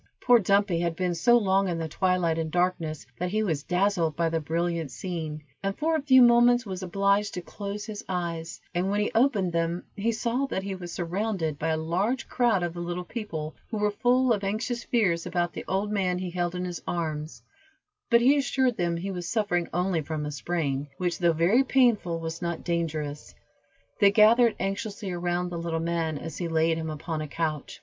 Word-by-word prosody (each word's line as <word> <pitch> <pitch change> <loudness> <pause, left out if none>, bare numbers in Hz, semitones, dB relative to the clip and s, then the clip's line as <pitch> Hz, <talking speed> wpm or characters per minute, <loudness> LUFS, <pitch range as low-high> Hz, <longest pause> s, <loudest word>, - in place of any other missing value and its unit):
Poor 245 -1 +5
Dumpy 200 -3 +2
had 170 -1 -1
been 180 0 0
so 240 +8 +4
long 195 -3 +2
in 175 -2 -1
the 165 -1 -3
twilight 175 -1 +1
and 160 -1 -2
darkness, 170 -3 -1
that 180 +1 -1
he 215 +3 0
was 160 -8 -1
dazzled 180 -2 +1
by 165 +1 +1
the 165 0 0
brilliant 165 0 -1
scene, 160 -3 -5 0.2
and 195 0 -2
for 320 +1 +1
a 315 - 0
few 260 -3 +6
moments 240 0 +5
was 190 -2 -5
obliged 200 +2 +1
to 180 - -3
close 205 +2 -6
his 215 0 -6
eyes, 170 -2 -3
and 180 +2 0
when 205 +1 +1
he 210 - 0
opened 220 -8 +2
them, 170 +1 -1
he 220 +3 0
saw 235 +4 -1
that 190 - -3
he 195 0 -3
was 175 -2 -7
surrounded 175 -4 -2
by 160 - -1
a 160 -1 +1
large 185 +11 -1
crowd 235 -7 +2
of 175 -1 -2
the 175 - -7
little 175 +1 -3
people, 165 -7 -5 0.2
who 225 - -3
were 210 0 +1
full 245 +3 +3
of 205 -2 -2
anxious 225 +4 -2
fears 180 -8 +1
about 175 -1 -1
the - - -6
old 200 +2 -1
man 185 -3 0
he 180 -1 -4
held 175 0 -2
in 180 0 -2
his 175 -1 -5
arms, 155 -2 -3 0.7
but 235 -2 +5
he 265 +4 +5
assured 260 -3 +1
them 170 -1 0
he 195 +4 -4
was 175 -2 -5
suffering 205 -6 0
only 180 -1 0
from 155 0 -4
a 150 - -3
sprain, 145 -2 -2
which, 175 -1 -1
though 170 -2 +4
very 175 +11 +3
painful, 235 -11 +2
was 165 +1 -5
not 170 -1 -3
dangerous. 155 -4 -3 0.6
They 200 - +7
gathered 225 +3 +5
anxiously 195 +1 -3
around 175 0 -1
the 170 -1 -4
little 165 -1 -2
man 165 -2 -1
as 160 +1 -7
he 175 - -2
laid 160 0 +2
him 160 0 -4
upon 155 +1 -4
a 155 - -4
couch. 155 -1 -3
180 Hz, 205 wpm, -27 LUFS, 165-210 Hz, 0.7 s, They